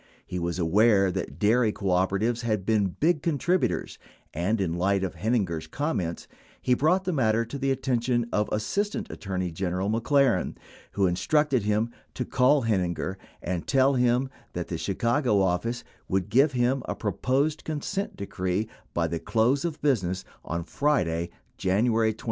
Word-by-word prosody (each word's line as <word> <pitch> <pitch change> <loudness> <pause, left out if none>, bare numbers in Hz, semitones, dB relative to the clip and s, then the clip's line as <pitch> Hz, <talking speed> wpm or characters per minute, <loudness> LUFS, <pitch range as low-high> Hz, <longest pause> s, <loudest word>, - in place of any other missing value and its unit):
He 90 - -4
was 85 0 -2
aware 95 +3 +4
that 90 -6 -4
dairy 110 +4 +3
cooperatives 100 +5 0
had 110 -5 -1
been 105 -2 +2
big 160 -1 +2
contributors 170 +4 0 0.3
and, 95 +7 0
in 90 -4 0
light 95 +3 +1
of 95 - -2
Heininger's 95 -9 -1
comments, 90 - -2 0.3
he 125 - +2
brought 160 +9 +2
the 185 -1 -1
matter 115 -4 +2
to 140 +4 -6
the 135 0 0
attention 125 -2 0
of 105 0 +1
Assistant 200 - -1
Attorney 95 -3 -3
General 95 +3 -1
McLaren, 120 - +2 0.4
who 100 - +2
instructed 130 - +2
him 105 +3 0 0.2
to 125 - -2
call 135 +2 +3
(Heininger 95 -3 -1 0.3
and 90 -2 -3
tell 135 0 +4
him 125 +1 +2 0.2
that - - -4
the - - -2
Chicago 120 -3 +1
office 95 +6 0 0.2
would 95 +1 -1
give 135 +5 +4
him 125 +2 +1
a - - -3
pro 105 - -2
posed 140 - 0
consent 160 +6 -3
decree 95 +1 -2 0.3
by 85 - +2
the 85 0 -2
close 120 - +1
of 160 -4 -4
business 95 -10 +1 0.2
on 85 0 -3
Friday, 85 - 0 0.3
January 110 +3 +2
28. - - -23
110 Hz, 155 wpm, -26 LUFS, 95-130 Hz, 0.4 s, aware